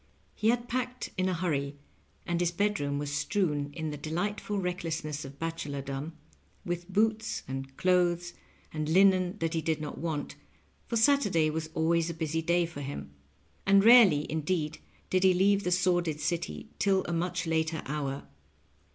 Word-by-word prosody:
He 215 - +1
had 240 0 +1
packed 250 +1 -3
in 185 0 +1
a - - 0
hurry, 145 -5 -2 0.5
and 170 0 -1
his 175 - +2
bedroom 175 -6 0
was 145 0 -3
strewn, 145 -2 0
in 160 0 -4
the 150 - -5
delightful 190 +7 -3
recklessness 165 -5 -3
of 135 0 -10
bachelordom, 145 -2 -4 0.5
with 175 +1 -4
boots 220 +2 +1
and 135 0 -6
clothes 175 -1 +2 0.4
and 155 -1 -2
linen 185 +1 +4
that 165 -3 -1
he 165 - 0
did 160 -1 -1
not 150 -1 -6
want, 155 -3 -3 0.5
for 235 - -1
Saturday 210 - +3
was 160 0 -3
always 165 +1 +2
a 170 - -4
busy 160 0 -1
day 170 +1 +2
for 165 -4 -8
him, 135 - -6 0.5
and 195 0 +5
rarely 215 -11 +7
indeed 155 0 -2 0.3
did 185 0 +2
he 185 -1 +5
leave 200 +2 +3
the 180 - -1
sor 180 0 +3
did 160 -3 -3
City 75 - -3
till 195 -1 +3
a 175 - -3
much 180 +1 -1
later 160 0 0
hour. 140 -1 -3
170 Hz, 165 wpm, -29 LUFS, 150-185 Hz, 0.5 s, rarely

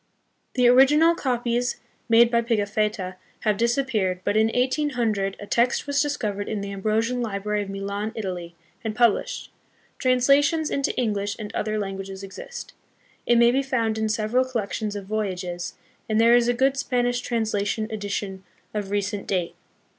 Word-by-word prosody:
The 250 -2 +4
original 290 +7 +6
copies 245 -4 -1 0.3
made 230 +1 +6
by 235 -1 +3
Pigafetta 210 -4 -1 0.2
have 215 -2 +2
disappeared, 230 -6 0
but - - 0
in 220 0 +4
1800 240 -6 0
a 205 - -7
text 235 +4 +1
was 285 0 +1
discovered 215 -9 -2
in 210 -2 -2
the 200 0 -5
Ambrosian 220 +5 0
Library 210 -1 -2
of 200 - -5
Milan, 200 +2 -3
Italy, 180 -5 -5 0.3
and 220 -2 -3
published. 240 - +1 0.5
Translations 280 +5 +3
into 275 - 0
English 205 -4 -1
and 210 -2 -7
other 215 0 -1
languages 195 -1 -5
exist. 480 - -8 0.5
It 240 - +5
may 235 0 +6
be 265 +2 +2
found 230 -5 -1
in 220 0 0
several 220 +3 +1
collections 215 -4 -3
of 200 -1 -5
Voyages, 180 -4 -3 0.3
and 215 0 +2
there 230 +1 +6
is 240 -1 +4
a 245 - +3
good 265 +2 +2
Spanish 245 -2 0
translation 220 -3 -1
and 215 - -6
edition 200 -2 -4 0.3
of 205 -2 -3
recent 205 0 -2
date. 180 -3 -1
220 Hz, 155 wpm, -24 LUFS, 200-245 Hz, 0.5 s, original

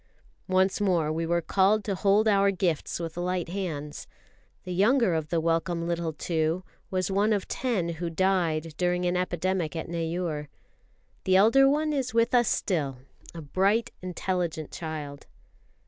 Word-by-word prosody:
Once 190 +1 +2
more 175 -6 +2
we 165 +1 -2
were 170 0 +1
called 200 +4 +3
to 200 - -2
hold 200 +3 +3
our 200 -1 +4
gifts 175 -6 -1
with 165 -1 -5
light 180 -1 -2
hands. 160 -6 -5 0.6
The 180 - -5
younger 215 +2 +3
of 160 -2 -2
the 170 - +1
welcome 165 +1 0
little 170 -1 -1
two 160 +2 -1 0.3
was 185 0 -1
one 205 +3 +2
of 205 -3 0
ten 230 -9 -1
who 170 +1 -3
died 165 -3 0
during 180 0 0
an 175 0 +1
epidemic 180 -1 -1
at 160 - -4
Neyoor. 165 -2 -3 0.8
The 185 - +3
elder 230 +8 +6
one 305 +2 +1
is 255 -4 -2
with 230 +1 +3
us 240 -2 +4
still 145 -9 -1 0.4
a 165 - -7
bright, 200 +10 +1
intelligent 180 -3 -3
child. 150 -3 -6
180 Hz, 155 wpm, -27 LUFS, 165-195 Hz, 0.8 s, elder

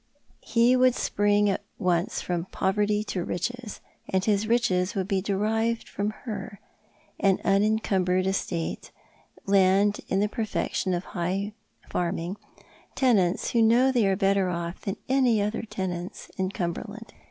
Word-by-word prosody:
He 235 +2 +3
would 255 -1 +4
spring 205 0 +2
at 195 - 0 0.2
once 180 -3 0
from 175 -1 -2
poverty 205 +3 0
to 185 -4 -3
riches, 220 +6 -4 0.3
and 190 0 +1
his 210 0 +1
riches 205 -4 +1
would 190 -2 -1
be 195 -2 0
derived 220 +4 0
from 205 +1 -2 0.2
her— 200 -3 -6 0.6
an 195 -1 +3
unencumbered 195 -3 +2
estate, 190 -3 -2 0.6
land 195 +1 +3
in 190 - +1
the 205 - +2
perfection 210 -4 -1
of 175 - -3
high 190 +4 -2 0.3
farming, 175 +2 -2 0.6
tenants 200 -9 +2
who 235 - +3
know 240 +4 +5
they 240 -6 +2
are 195 - +2
better 195 -1 +2
off 170 0 -4
than 195 +1 -3
any 255 -4 +3
other 210 +2 -1
tenants 185 -4 -5
in 190 -1 -1
Cumberland. 205 +5 -5
200 Hz, 140 wpm, -26 LUFS, 185-220 Hz, 0.6 s, know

